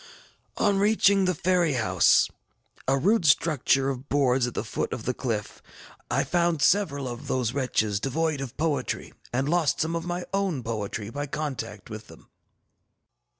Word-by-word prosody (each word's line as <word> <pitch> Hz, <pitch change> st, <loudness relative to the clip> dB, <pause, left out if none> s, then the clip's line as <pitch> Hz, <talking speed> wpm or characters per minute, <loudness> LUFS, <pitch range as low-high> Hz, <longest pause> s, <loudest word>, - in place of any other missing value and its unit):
ŌĆ£On 200 Hz, -2 st, +2 dB
reaching 200 Hz, -2 st, +4 dB
the 180 Hz, -1 st, +1 dB
ferry 175 Hz, -2 st, +2 dB
house, 95 Hz, -8 st, +4 dB, 0.6 s
a 135 Hz, +1 st, +3 dB
rude 200 Hz, +8 st, +2 dB
structure 140 Hz, -3 st, +3 dB
of 135 Hz, +1 st, -8 dB
boards 130 Hz, -3 st, +2 dB
at 120 Hz, -, -7 dB
the -, -, -1 dB
foot -, -, -3 dB
of -, -, -6 dB
the -, -, 0 dB
cliff, -, -, -4 dB, 0.5 s
I -, -, +1 dB
found 170 Hz, -4 st, +1 dB
several 145 Hz, -9 st, +2 dB
of 120 Hz, -1 st, -7 dB
those 125 Hz, -2 st, 0 dB
wretches 110 Hz, -7 st, 0 dB
devoid 150 Hz, +3 st, -1 dB
of 130 Hz, -3 st, -7 dB
poetry, 155 Hz, -2 st, -2 dB, 0.2 s
and 130 Hz, +3 st, 0 dB
lost 165 Hz, -2 st, +1 dB
some 160 Hz, +1 st, 0 dB
of 165 Hz, -, -2 dB
my 175 Hz, +1 st, -4 dB
own 190 Hz, -9 st, 0 dB
poetry 110 Hz, -1 st, -4 dB
by 145 Hz, +2 st, -4 dB
contact 125 Hz, -9 st, -5 dB
with 110 Hz, 0 st, -8 dB
them. -, -, -16 dB
140 Hz, 160 wpm, -26 LUFS, 125-175 Hz, 0.6 s, reaching